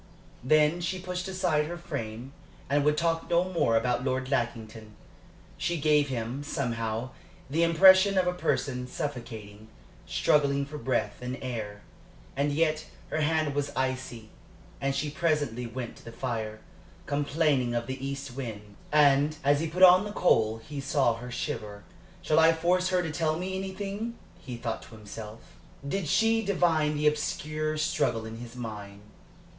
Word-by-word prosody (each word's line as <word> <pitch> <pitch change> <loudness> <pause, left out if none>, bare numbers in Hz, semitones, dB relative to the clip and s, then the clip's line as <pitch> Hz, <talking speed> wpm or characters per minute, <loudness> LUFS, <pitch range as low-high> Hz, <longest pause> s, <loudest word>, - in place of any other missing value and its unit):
Then 155 +5 +4
she 185 +2 -2
pushed 180 0 -4
aside 180 -5 +1
her 175 +2 -5
frame 130 -6 -6 0.4
and 145 0 +3
would 150 +1 +2
talk 165 0 0
no 170 +1 +4
more 170 -11 +1
about 125 +2 0
Lord 130 0 -1
Lackington. 110 -4 -3 0.6
She 175 -1 0
gave 150 -1 +3
him, 125 +2 -3
somehow, 120 -4 -2 0.4
the 160 +3 +1
impression 190 +4 +6
of 185 - +4
a 180 - +1
person 125 -7 -1
suffocating, 110 -6 -6 0.4
struggling 140 - +2
for 150 +1 -8
breath 130 -3 -1
and 125 +1 -4
air. 110 -5 -5 0.5
And 140 +2 +1
yet 155 +1 +1 0.2
her 155 - 0
hand 155 -1 +1
was 145 0 -1
icy, 130 -4 -3 0.5
and 135 0 0
she 145 +1 -1
presently 145 -7 0
went 120 0 -6
to - - -17
the 115 - -8
fire, 110 -3 -4 0.4
complaining 145 -3 +1
of 120 0 -1
the 130 +2 -6
east 135 -2 -5
wind; 105 -6 -7
and 145 0 +4
as 145 +1 +4
he 165 - -1
put 180 +4 +1
on 185 +1 +9
the 210 - -5
coal 110 - +3
he 145 -2 -5
saw 135 -3 +2
her 125 +2 -8
shiver. 105 -6 -5 0.4
"Shall 155 - +3
I 165 0 +6
force 180 +3 +1
her 180 -1 +2
to 160 - -3
tell 155 0 0
me 185 +2 -3
everything?" 200 +4 -4 0.2
he 130 -8 -7
thought 115 -1 -3
to 115 - -13
himself. 110 +1 -9 0.5
Did 185 +2 -2
she 225 +7 +3
divine 165 -6 +2
the 150 - -1
obscure 155 +1 0
struggle 115 -7 0
in 110 0 -7
his 120 0 -9
mind? 105 -4 -7
145 Hz, 160 wpm, -28 LUFS, 120-165 Hz, 0.6 s, on